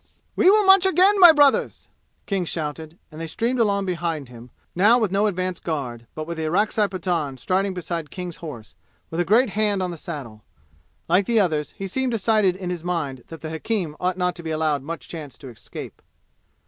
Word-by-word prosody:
"We 370 Hz, -, +5 dB
will 420 Hz, +1 st, +5 dB
march 385 Hz, 0 st, +7 dB
again, 380 Hz, +2 st, +4 dB
my 350 Hz, -3 st, +10 dB
brothers!" 290 Hz, -3 st, +2 dB, 0.4 s
King 195 Hz, -3 st, -1 dB
shouted, 160 Hz, 0 st, -4 dB
and 155 Hz, +1 st, -9 dB
they 165 Hz, -, -4 dB
streamed 235 Hz, +9 st, -1 dB
along 200 Hz, -3 st, +2 dB
behind 165 Hz, -6 st, -3 dB
him, 120 Hz, 0 st, -12 dB, 0.2 s
now 210 Hz, +7 st, +5 dB
with 215 Hz, -6 st, 0 dB
no 200 Hz, +2 st, +2 dB
advance 185 Hz, -2 st, -2 dB
guard, 125 Hz, -8 st, -4 dB
but 155 Hz, -, -4 dB
with 170 Hz, +1 st, -6 dB
the 160 Hz, -, -1 dB
Orakzai 210 Hz, +4 st, +1 dB
Pathan 175 Hz, -8 st, -2 dB
striding 185 Hz, +8 st, -1 dB
beside 170 Hz, -3 st, -4 dB
King's 180 Hz, -3 st, -7 dB
horse, 130 Hz, -10 st, -9 dB, 0.4 s
with 165 Hz, -, -3 dB
a -, -, +3 dB
great 220 Hz, +6 st, +3 dB
hand 205 Hz, -2 st, +1 dB
on 180 Hz, -, -2 dB
the 170 Hz, -, -7 dB
saddle. 130 Hz, -10 st, -8 dB, 0.6 s
Like 185 Hz, +3 st, +2 dB
the 235 Hz, -2 st, +3 dB
others, 155 Hz, -6 st, 0 dB
he 195 Hz, -, -5 dB
seemed 255 Hz, +6 st, -1 dB
decided 215 Hz, -4 st, +2 dB
in 185 Hz, -1 st, -5 dB
his 175 Hz, -2 st, -5 dB
mind 145 Hz, -8 st, -3 dB
that 165 Hz, -2 st, -10 dB
the 155 Hz, 0 st, -6 dB
hakim 165 Hz, -1 st, -2 dB
ought 185 Hz, 0 st, -1 dB
not 180 Hz, -1 st, 0 dB
to -, -, -7 dB
be 165 Hz, -, -6 dB
allowed 155 Hz, -2 st, 0 dB
much 165 Hz, +5 st, -7 dB
chance 155 Hz, -5 st, -8 dB
to 135 Hz, -, -10 dB
escape. 115 Hz, -, -9 dB
180 Hz, 200 wpm, -23 LUFS, 155-205 Hz, 0.6 s, my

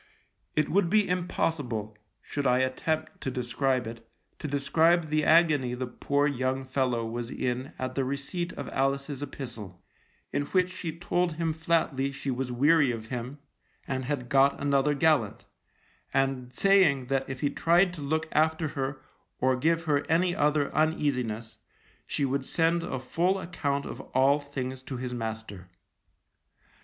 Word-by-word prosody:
It 155 Hz, -1 st, +2 dB
would 190 Hz, -2 st, +2 dB
be 210 Hz, +1 st, +3 dB
impossible, 145 Hz, -, -1 dB, 0.3 s
should 145 Hz, -1 st, -2 dB
I 125 Hz, -, +4 dB
attempt 155 Hz, +5 st, -1 dB
to -, -, -2 dB
describe 125 Hz, +1 st, 0 dB
it, 115 Hz, +1 st, -8 dB, 0.4 s
to -, -, -4 dB
describe 160 Hz, +4 st, +2 dB
the 155 Hz, 0 st, +1 dB
agony 150 Hz, -7 st, +4 dB
the 130 Hz, +1 st, -3 dB
poor 140 Hz, +3 st, 0 dB
young 130 Hz, -1 st, -1 dB
fellow 130 Hz, -3 st, 0 dB
was 115 Hz, +1 st, -4 dB
in 125 Hz, +2 st, -3 dB
at 130 Hz, 0 st, -3 dB
the 135 Hz, -, 0 dB
receipt 140 Hz, +7 st, -3 dB
of 140 Hz, -, -6 dB
Alice's 140 Hz, +1 st, -1 dB
epistle, 115 Hz, -10 st, -7 dB, 0.5 s
in 145 Hz, -, 0 dB
which 185 Hz, -1 st, +2 dB
she 170 Hz, -3 st, -5 dB
told 175 Hz, 0 st, 0 dB
him 165 Hz, 0 st, -1 dB
flatly 160 Hz, -4 st, 0 dB
she 135 Hz, 0 st, -4 dB
was 125 Hz, 0 st, -2 dB
weary 145 Hz, +3 st, +4 dB
of 115 Hz, -2 st, -4 dB
him 125 Hz, +3 st, -5 dB, 0.5 s
and 130 Hz, -1 st, -2 dB
had 130 Hz, -3 st, -2 dB
got 135 Hz, +2 st, +4 dB
another 140 Hz, +1 st, +2 dB
gallant; 140 Hz, -8 st, +2 dB, 0.7 s
and 135 Hz, -2 st, 0 dB
saying 180 Hz, -8 st, +4 dB
that 135 Hz, +1 st, -1 dB
if 135 Hz, -2 st, -5 dB
he 145 Hz, -, +1 dB
tried 175 Hz, +4 st, +3 dB
to 165 Hz, -, -8 dB
look 155 Hz, +3 st, -1 dB
after 160 Hz, +1 st, +2 dB
her 135 Hz, -1 st, -4 dB, 0.4 s
or 130 Hz, 0 st, +3 dB
give 165 Hz, +5 st, +1 dB
her 145 Hz, -3 st, +1 dB
any 175 Hz, +2 st, +2 dB
other 150 Hz, -1 st, +1 dB
uneasiness, 125 Hz, -8 st, 0 dB, 0.5 s
she 140 Hz, -, 0 dB
would 135 Hz, 0 st, -1 dB
send 165 Hz, +1 st, +2 dB
a 165 Hz, -6 st, -3 dB
full 175 Hz, +9 st, +1 dB
account 145 Hz, -6 st, -2 dB
of -, -, -6 dB
all 135 Hz, +3 st, +5 dB
things 130 Hz, -3 st, -5 dB
to 130 Hz, 0 st, -6 dB
his 125 Hz, 0 st, -4 dB
master. 110 Hz, -5 st, -6 dB
140 Hz, 155 wpm, -28 LUFS, 130-160 Hz, 0.7 s, all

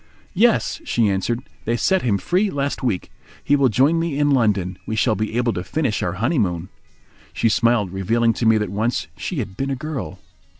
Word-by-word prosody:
"Yes," 230 Hz, -, +2 dB
she 115 Hz, -, +1 dB
answered. 115 Hz, +6 st, -1 dB, 0.2 s
"They 115 Hz, +2 st, 0 dB
set 190 Hz, +10 st, +2 dB
him 110 Hz, -5 st, +1 dB
free 185 Hz, -, +1 dB
last 140 Hz, -3 st, -2 dB
week. 115 Hz, -9 st, -2 dB, 0.3 s
He 145 Hz, -, +3 dB
will 140 Hz, -2 st, +3 dB
join 140 Hz, +9 st, +3 dB
me 165 Hz, -4 st, -2 dB
in 145 Hz, 0 st, +2 dB
London. 100 Hz, -8 st, +1 dB
We 110 Hz, -, -2 dB
shall 110 Hz, +1 st, +2 dB
be 110 Hz, +2 st, -2 dB
able 120 Hz, -2 st, +1 dB
to 90 Hz, -, -4 dB
finish 140 Hz, -2 st, -1 dB
our 90 Hz, -, -1 dB
honeymoon." 95 Hz, -, -1 dB, 0.6 s
She 115 Hz, -, +1 dB
smiled, 115 Hz, -3 st, +2 dB
revealing 115 Hz, +5 st, +1 dB
to 115 Hz, +1 st, -1 dB
me 110 Hz, 0 st, +5 dB
that 105 Hz, -3 st, -2 dB
once 110 Hz, +4 st, -1 dB
she 180 Hz, -, -5 dB
had 100 Hz, -7 st, -4 dB
been 135 Hz, +6 st, -2 dB
a 135 Hz, -, -1 dB
girl. 155 Hz, -1 st, -5 dB
120 Hz, 200 wpm, -21 LUFS, 105-140 Hz, 0.6 s, me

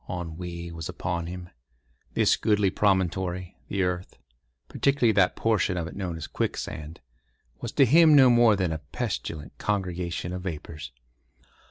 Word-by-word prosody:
Ennui 85 Hz, 0 st, -5 dB
was 80 Hz, -1 st, -6 dB
upon 85 Hz, -1 st, -3 dB
him. 90 Hz, 0 st, -7 dB, 0.7 s
This -, -, +4 dB
goodly 105 Hz, -3 st, +2 dB
promontory, 95 Hz, -2 st, 0 dB
the 95 Hz, -1 st, 0 dB
earth—particularly 90 Hz, -, -2 dB
that 95 Hz, -3 st, +3 dB
portion 105 Hz, -4 st, +1 dB
of 85 Hz, -, -2 dB
it 85 Hz, -, -8 dB
known 90 Hz, -4 st, -4 dB
as 80 Hz, -, -5 dB
Quicksand—was -, -, -6 dB
to 135 Hz, -, +5 dB
him 155 Hz, +4 st, +7 dB
no 130 Hz, -3 st, +8 dB
more 120 Hz, -3 st, +6 dB
than 90 Hz, -4 st, 0 dB
a 80 Hz, -, -4 dB
pestilent 75 Hz, +1 st, -5 dB
congregation 90 Hz, -3 st, -2 dB
of 90 Hz, -, -4 dB
vapours. 75 Hz, -5 st, -6 dB
90 Hz, 135 wpm, -26 LUFS, 80-100 Hz, 0.7 s, no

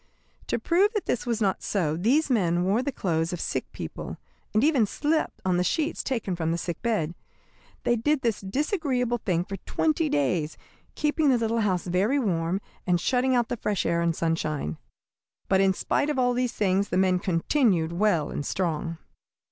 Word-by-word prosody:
To -, -, 0 dB
prove 380 Hz, +5 st, +3 dB
that 420 Hz, -, -2 dB
this 245 Hz, -, -1 dB
was 230 Hz, -2 st, -1 dB
not 195 Hz, -3 st, +1 dB
so, 165 Hz, -7 st, 0 dB
these 245 Hz, -, +2 dB
men 180 Hz, -9 st, +2 dB
wore 200 Hz, +6 st, +2 dB
the 280 Hz, -, -2 dB
clothes 165 Hz, -8 st, -1 dB
of 175 Hz, -, -4 dB
sick -, -, -3 dB
people, -, -, -6 dB, 0.3 s
and 215 Hz, +3 st, +2 dB
even 280 Hz, -8 st, +4 dB
slept 310 Hz, +8 st, -1 dB
on 180 Hz, -1 st, +2 dB
the 180 Hz, -, +2 dB
sheets 310 Hz, -, 0 dB
taken 230 Hz, -8 st, -2 dB
from 165 Hz, -1 st, -1 dB
the 170 Hz, -, 0 dB
sickbed. 175 Hz, -1 st, -2 dB, 0.7 s
They 240 Hz, -, +2 dB
did 295 Hz, +5 st, +1 dB
this 230 Hz, -4 st, 0 dB
disagreeable 255 Hz, -, -1 dB
thing 175 Hz, -5 st, 0 dB
for 195 Hz, +1 st, -6 dB
twenty 315 Hz, -, 0 dB
days, 150 Hz, -, 0 dB, 0.4 s
keeping 300 Hz, 0 st, +2 dB
the 255 Hz, -, +4 dB
little 230 Hz, 0 st, 0 dB
house 190 Hz, -5 st, 0 dB
very 190 Hz, +10 st, +1 dB
warm, 185 Hz, -6 st, 0 dB, 0.3 s
and 175 Hz, -1 st, +3 dB
shutting 255 Hz, +6 st, +2 dB
out 240 Hz, -2 st, +1 dB
the 245 Hz, -, -2 dB
fresh 210 Hz, -2 st, -1 dB
air 170 Hz, 0 st, +1 dB
and 170 Hz, -1 st, +1 dB
sunshine. 155 Hz, -, -2 dB, 0.7 s
But 190 Hz, 0 st, +3 dB
in 195 Hz, 0 st, +4 dB
spite 285 Hz, +9 st, 0 dB
of 295 Hz, -, -1 dB
all 245 Hz, -1 st, +3 dB
these 250 Hz, -1 st, 0 dB
things 200 Hz, 0 st, +1 dB
the -, -, 0 dB
men 185 Hz, -1 st, +3 dB
continued 180 Hz, -, +1 dB
well 175 Hz, -5 st, +1 dB
and -, -, -3 dB
strong. 165 Hz, 0 st, -2 dB
200 Hz, 185 wpm, -26 LUFS, 175-250 Hz, 0.7 s, even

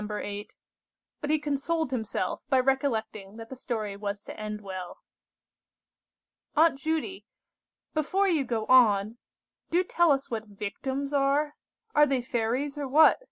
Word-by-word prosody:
8; 205 Hz, 0 st, -5 dB, 0.7 s
but 295 Hz, -, -3 dB
he 310 Hz, -, +4 dB
consoled 295 Hz, +1 st, -1 dB
himself 220 Hz, -6 st, -2 dB
by 265 Hz, -3 st, +4 dB
recollecting 225 Hz, -6 st, -1 dB
that 225 Hz, 0 st, -9 dB
the 265 Hz, -, -7 dB
story 220 Hz, -5 st, -3 dB
was 200 Hz, 0 st, -4 dB
to -, -, -9 dB
end 210 Hz, 0 st, -5 dB
well. 185 Hz, -3 st, -7 dB, 1.6 s
"Aunt 315 Hz, -3 st, +4 dB
Judy, 320 Hz, +6 st, -2 dB, 0.7 s
before 370 Hz, +6 st, +1 dB
you 325 Hz, -7 st, +2 dB
go 230 Hz, -4 st, -2 dB
on, 220 Hz, -3 st, +4 dB, 0.5 s
do 350 Hz, +2 st, +3 dB
tell 345 Hz, -3 st, +3 dB
us 275 Hz, -2 st, 0 dB
what 220 Hz, -1 st, -3 dB
victims 265 Hz, +8 st, -4 dB
are? 285 Hz, +2 st, +2 dB, 0.4 s
Are 295 Hz, -5 st, +6 dB
they 265 Hz, -3 st, 0 dB
fairies, 250 Hz, +5 st, -1 dB
or 285 Hz, -, -2 dB
what? 300 Hz, +5 st, +6 dB
260 Hz, 140 wpm, -28 LUFS, 215-295 Hz, 1.6 s, Are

